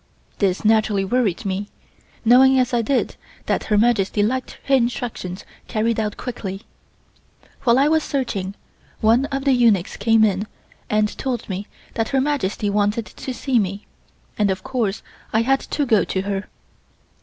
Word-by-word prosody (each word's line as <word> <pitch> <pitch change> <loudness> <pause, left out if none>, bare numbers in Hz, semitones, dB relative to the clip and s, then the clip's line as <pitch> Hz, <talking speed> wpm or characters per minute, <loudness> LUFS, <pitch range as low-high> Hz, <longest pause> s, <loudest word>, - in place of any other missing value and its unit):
This 195 +1 0
naturally 215 -2 +3
worried 225 -1 0
me, 195 +1 -2 0.6
knowing 265 +3 +6
as 255 -1 +1
I 240 - +3
did 265 +4 0 0.3
that - - -1
Her 210 - +2
Majesty 210 -2 +2
liked 255 +4 -2
her 275 - 0
instructions 235 -7 -1 0.2
carried 225 0 0
out 210 -1 -2
quickly. 200 -5 -5 1.0
While 235 0 +5
I 275 +2 +4
was 315 +1 +3
searching, 200 -10 -3 0.4
one 230 +5 +4
of 275 -1 -4
the 275 - +4
eunuchs 225 -8 +2
came 225 -1 +4
in 205 0 +1 0.4
and 215 0 +1
told 250 -4 -3
me 195 +1 -4 0.3
that 225 -1 -1
Her 270 - +2
Majesty 260 -8 -1
wanted 205 +2 +1
to 260 - -7
see 255 -1 +1
me, 200 0 -3 0.5
and 205 -1 +3
of 190 - -2
course 240 -6 -2 0.3
I 220 +1 +3
had 270 +3 +3
to 290 - -2
go 220 -5 +3
to 190 - -2
her. 195 0 -3
225 Hz, 160 wpm, -21 LUFS, 200-255 Hz, 1.0 s, knowing